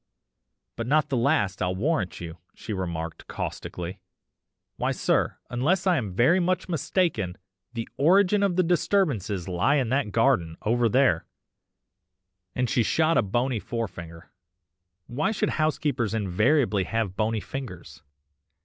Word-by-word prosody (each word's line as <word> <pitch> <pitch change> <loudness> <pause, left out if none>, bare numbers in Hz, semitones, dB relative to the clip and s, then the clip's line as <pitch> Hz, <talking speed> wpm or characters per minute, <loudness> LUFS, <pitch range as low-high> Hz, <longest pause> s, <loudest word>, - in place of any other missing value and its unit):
"'But 115 - -3
not 150 +3 +2
the 135 - 0
last, 105 -5 +1
I'll 90 +1 0
warrant 105 - -1
you,' 85 0 -8 0.2
she 110 - -6
remarked 85 -4 -4
caustically. 90 +3 -5 0.8
'Why - - 0
sir, - - 0
unless 145 +12 +1
I 180 -3 +3
am 105 -6 -3
very 130 - +4
much 180 +1 0
mistaken, 155 - -1 0.4
the 115 -1 -4
origin 195 +6 +4
of 195 -3 +2
the 185 - +3
disturbances 145 - 0
lies 95 +11 +2
in 120 - -2
that 130 -4 0
garden, 110 -9 +2
over 120 +1 +2
there,' 125 -8 +2 1.3
and 125 0 +1
she 120 - +2
shot 160 +8 +2
a - - +5
bony 120 +4 0
forefinger 90 -8 -6 0.7
(why 130 +6 -1
should 215 - 0
housekeepers 145 -7 0
invariably 105 - +2
have 110 -2 -2
bony 110 +1 0
fingers?) 90 - -8
115 Hz, 135 wpm, -26 LUFS, 95-150 Hz, 1.3 s, a